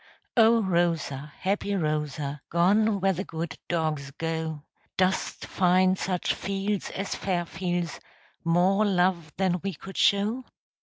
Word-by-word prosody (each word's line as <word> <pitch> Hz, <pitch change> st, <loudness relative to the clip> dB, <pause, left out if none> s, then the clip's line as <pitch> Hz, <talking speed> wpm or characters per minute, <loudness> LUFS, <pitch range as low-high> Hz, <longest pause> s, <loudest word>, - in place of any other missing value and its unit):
O 230 Hz, -1 st, +5 dB
Rosa, 165 Hz, -6 st, 0 dB
happy 200 Hz, +1 st, 0 dB
Rosa, 150 Hz, -4 st, -2 dB
Gone 200 Hz, +5 st, +3 dB
where 195 Hz, 0 st, +3 dB
the 185 Hz, +2 st, -3 dB
good 165 Hz, -4 st, -5 dB
dogs 155 Hz, -4 st, -1 dB
go, 160 Hz, 0 st, -3 dB, 0.3 s
Dost 185 Hz, 0 st, 0 dB
find 185 Hz, 0 st, +3 dB
such 180 Hz, -2 st, 0 dB
fields 195 Hz, 0 st, -2 dB
as 195 Hz, +1 st, -3 dB
"Fairfields," 175 Hz, -2 st, -2 dB, 0.4 s
More 180 Hz, +5 st, +3 dB
love 180 Hz, -5 st, +1 dB
than 185 Hz, -1 st, +1 dB
we 195 Hz, -3 st, -2 dB
could 195 Hz, +6 st, -10 dB
show? 210 Hz, +6 st, +3 dB
180 Hz, 120 wpm, -27 LUFS, 160-195 Hz, 0.4 s, O